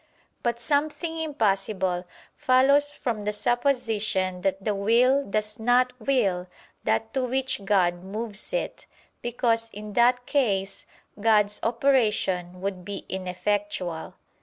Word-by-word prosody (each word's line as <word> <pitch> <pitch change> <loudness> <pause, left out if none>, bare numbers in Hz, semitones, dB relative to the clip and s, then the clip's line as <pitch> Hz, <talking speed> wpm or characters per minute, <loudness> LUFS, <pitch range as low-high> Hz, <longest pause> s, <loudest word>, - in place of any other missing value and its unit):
But 235 -1 -1
something 310 +5 -1
impossible 195 - 0 0.3
follows 280 +3 +4
from 235 -7 -3
the 210 - 0
supposition 220 -6 0
that 195 0 -1
the 210 - +1
will 240 +7 +3
does 210 -1 -2
not 250 +2 +3
will 205 -8 +1 0.4
that 220 0 0
to 265 - 0
which 255 -4 -1
God 180 -3 +2
moves 210 - -5
it: - - -3 0.3
because 230 -1 0
in 210 0 -8
that 245 +2 +3
case 195 -10 0 0.3
God's 210 -1 +3
operation 215 -8 +1
would 190 -2 -3
be 200 +1 -6
ineffectual. 185 -2 -3
215 Hz, 115 wpm, -26 LUFS, 195-250 Hz, 0.4 s, follows